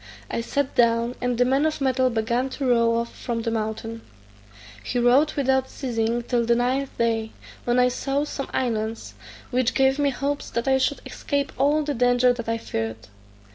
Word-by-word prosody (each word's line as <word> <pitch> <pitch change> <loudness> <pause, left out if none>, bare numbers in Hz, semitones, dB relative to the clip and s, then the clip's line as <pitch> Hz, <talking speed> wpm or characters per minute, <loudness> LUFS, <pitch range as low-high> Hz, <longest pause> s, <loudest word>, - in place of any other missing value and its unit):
I - - -1
sat 280 +3 -2
down, 235 0 +2
and 245 -1 0
the 245 - +4
man 270 +3 +2
of 310 - -3
metal 260 -1 +2
began 235 +3 0
to 275 - -2
row 230 -1 +3
off 235 0 -3
from 230 -2 -3
the 230 - -1
mountain. 225 +1 -3 0.8
He 245 - -3
rowed 255 +6 +4
without 265 -2 +1
ceasing 235 -2 -2
till 240 0 0
the 235 +1 +3
ninth 260 +3 -1
day, 225 -1 0 0.3
when 240 0 +2
I 250 0 +5
saw 275 +3 -1
some 280 -2 -5
islands, 225 -3 -2 0.4
which 250 -1 +1
gave 270 +1 +3
me 285 -1 +3
hopes 280 +2 -3
that 235 +3 -3
I 265 0 +4
should 280 +2 0
escape 285 -1 -2
all 295 +2 +2
the 290 0 -2
danger 245 0 +3
that 235 -2 -6
I 230 - 0
feared. 110 - -5
245 Hz, 185 wpm, -24 LUFS, 230-270 Hz, 0.8 s, I